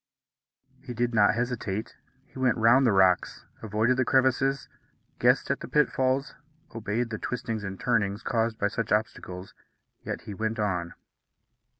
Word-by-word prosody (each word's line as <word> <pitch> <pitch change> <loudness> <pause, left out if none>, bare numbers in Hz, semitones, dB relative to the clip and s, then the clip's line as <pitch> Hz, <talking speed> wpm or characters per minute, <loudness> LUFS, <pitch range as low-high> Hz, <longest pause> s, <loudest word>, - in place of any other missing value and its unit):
He 125 - -7
did 120 +1 0
not 105 -1 +4
hesitate. 115 -4 -3 0.3
He - - -13
went 130 -2 +2
round 120 +4 +5
the - - +4
rocks, 95 -2 +2 0.2
avoided 110 +3 +1
the 130 - +3
crevices, 130 +1 +2 0.5
guessed - - +3
at - - -1
the - - -7
pitfalls, 135 -1 +1 0.4
obeyed 115 +2 -2
the 110 - -4
twistings 115 -3 -4
and 95 -1 -6
turnings 105 -3 0
caused 115 -2 0
by 105 - 0
such 115 +2 -3
obstacles, 95 -3 -2 0.5
yet - - -4
he 105 - -8
went 110 +3 -2
on. 90 -5 -2
115 Hz, 145 wpm, -27 LUFS, 105-125 Hz, 0.5 s, round